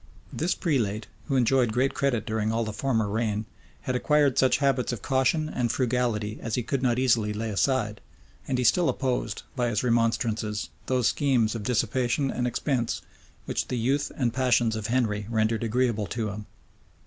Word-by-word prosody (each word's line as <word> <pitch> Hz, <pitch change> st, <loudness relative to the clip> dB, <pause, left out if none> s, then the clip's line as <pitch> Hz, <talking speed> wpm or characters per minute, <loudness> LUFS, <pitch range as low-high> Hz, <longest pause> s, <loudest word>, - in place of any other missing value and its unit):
This 170 Hz, +4 st, 0 dB
prelate, 110 Hz, -, 0 dB, 0.2 s
who 140 Hz, -, 0 dB
enjoyed 125 Hz, -1 st, +3 dB
great 130 Hz, +4 st, +1 dB
credit 120 Hz, -6 st, 0 dB
during 110 Hz, 0 st, -1 dB
all 115 Hz, +1 st, 0 dB
the 110 Hz, -1 st, -4 dB
former 115 Hz, -3 st, 0 dB
reign, 110 Hz, 0 st, -1 dB, 0.4 s
had 130 Hz, -, -2 dB
acquired 145 Hz, 0 st, +3 dB
such 130 Hz, -1 st, +4 dB
habits 135 Hz, -3 st, +1 dB
of 120 Hz, -, -5 dB
caution 135 Hz, +4 st, +1 dB
and 125 Hz, -6 st, -1 dB
frugality 120 Hz, -4 st, -1 dB
as 115 Hz, -, -2 dB
he 125 Hz, -, -1 dB
could 135 Hz, +3 st, -2 dB
not 125 Hz, -2 st, +2 dB
easily 115 Hz, -5 st, +2 dB
lay 110 Hz, +1 st, -3 dB
aside; 105 Hz, -1 st, 0 dB, 0.5 s
and 130 Hz, -, 0 dB
he 125 Hz, -, 0 dB
still 165 Hz, +8 st, +4 dB
opposed, 130 Hz, -2 st, -2 dB
by 125 Hz, -2 st, +1 dB
his 105 Hz, 0 st, -1 dB
remonstrances, 115 Hz, -3 st, 0 dB, 0.2 s
those 125 Hz, -3 st, +2 dB
schemes 125 Hz, -7 st, +1 dB
of 115 Hz, -, -4 dB
dissipation 125 Hz, +4 st, 0 dB
and 125 Hz, 0 st, -1 dB
expense, 120 Hz, 0 st, -1 dB, 0.4 s
which -, -, -2 dB
the 125 Hz, -, -2 dB
youth 135 Hz, +5 st, 0 dB
and 120 Hz, -4 st, 0 dB
passions 120 Hz, -3 st, +2 dB
of 110 Hz, -1 st, -3 dB
Henry 110 Hz, -4 st, 0 dB
rendered 110 Hz, 0 st, +1 dB
agreeable 115 Hz, -2 st, 0 dB
to 115 Hz, -3 st, -2 dB
him. 105 Hz, +1 st, -7 dB
120 Hz, 175 wpm, -26 LUFS, 110-130 Hz, 0.5 s, such